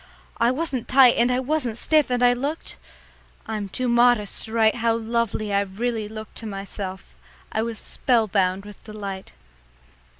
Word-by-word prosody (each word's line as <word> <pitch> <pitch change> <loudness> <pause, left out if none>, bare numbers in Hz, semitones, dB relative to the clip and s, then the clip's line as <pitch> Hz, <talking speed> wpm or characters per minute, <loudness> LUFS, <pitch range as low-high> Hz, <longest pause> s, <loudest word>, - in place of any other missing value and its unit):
I 235 - +4
wasn't 260 -3 -2
tight 255 -2 +6
and 240 +2 +3
I 250 - +1
wasn't 260 -4 -1
stiff, 305 0 +2
and 245 0 +1
I 245 0 +6
looked 280 +6 -4 0.7
I'm 210 -3 -4
too 255 +6 -2
modest 235 -3 +3
to 220 - -10
write 225 0 +3
how 230 -1 +2
lovely 225 -2 -1
I 200 - +3
really 215 +2 -3
looked 220 0 -9
to 225 - -3
myself. 195 -1 -6 0.4
I 220 - 0
was 230 0 -3
spellbound 200 -7 0
with 210 -1 -12
delight. 200 -3 -7
225 Hz, 160 wpm, -23 LUFS, 210-245 Hz, 0.7 s, tight